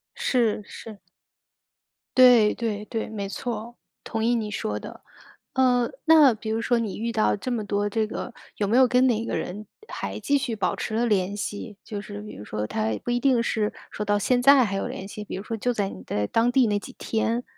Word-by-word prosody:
是， 230 -5 +1
是。 215 -1 -10 1.1
对， 245 -4 +7
对， 215 -3 -3
对， 225 0 -4
没 205 -2 -4
错 225 +4 -4
儿， 235 +2 -10 0.3
同 225 -1 -3
意 240 +2 +3
你 220 -2 -2
说 105 - -3
的。 - - -10 0.5
呃， 250 -2 +3
那 310 -6 +7
比 220 0 -6
如 220 +1 0
说 240 +1 +1
你 220 -4 -3
遇 230 +2 -2
到 215 -2 +2
这 230 +5 -5
么 225 -3 -2
多 205 0 0
这 220 +1 0
个， 235 +2 -6 0.2
有 205 - 0
没 220 +4 +2
有 260 0 +7
跟 250 +1 +4
哪 230 -3 +1
个 - - -2
人 210 +4 -5 0.2
还 - - -5
继 285 - +1
续 245 -5 -2
保 205 - 0
持 215 - -4
了 235 +2 +1
联 200 -2 +1
系， 205 0 -5
就 205 -2 -5
是 205 0 -8
比 210 - -9
如 105 - -9
说 105 0 -3
他 110 +1 -1
不 - - -2
一 245 0 +1
定 255 -3 +3
是 215 -2 0 0.2
说 210 - -4
到 205 0 +2
现 245 +5 +1
在 275 0 +7
还 200 -3 -2
有 195 - -2
联 190 - -6
系， 210 +1 -7
比 - - -6
如 190 - -5
说 225 - -4
就 245 +3 0
在 205 -4 -1
你 95 - -9
在 105 +3 -2
当 230 - +2
地 250 0 +4
那 205 -1 +1
几 260 - -10
天， 230 +2 -1
220 Hz, 240 characters per minute, -25 LUFS, 205-240 Hz, 1.1 s, 对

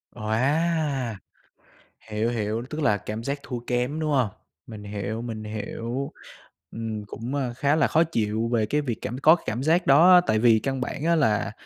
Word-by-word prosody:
Wow! 135 +3 0 0.9
Hiểu, 110 +2 0
hiểu, 110 -1 -2
tức 155 +1 -4
là 105 -8 +3
cảm 110 +3 -6
giác 140 +3 -3
thua 125 -2 -5
kém, 125 +5 -1
đúng 155 -1 -1
hông? 130 -6 +2 0.4
Mình 110 -3 -9
hiểu, 105 +2 -4
mình 115 -2 -6
hiểu. 115 +5 -4 0.6
Ừm, 110 -2 -5
cũng, 120 +6 -5
a, 130 -4 -2
khá 140 +4 +1
là 155 -3 +3
khó 160 - +3
chịu 110 -7 -1
về 110 -2 +2
cái 150 +7 0
việc 125 -6 -2
cảm 120 +4 -4
có 155 +4 +6
cảm 120 +4 -2
giác 165 +4 +2
đó 160 +7 +7
á, 180 - +8
tại 110 - +2
vì 115 -1 +5
căn 135 +2 -3
bản 140 +3 -4
á 170 +1 +3
là 110 -10 +1
120 Hz, 190 wpm, -25 LUFS, 110-145 Hz, 0.9 s, á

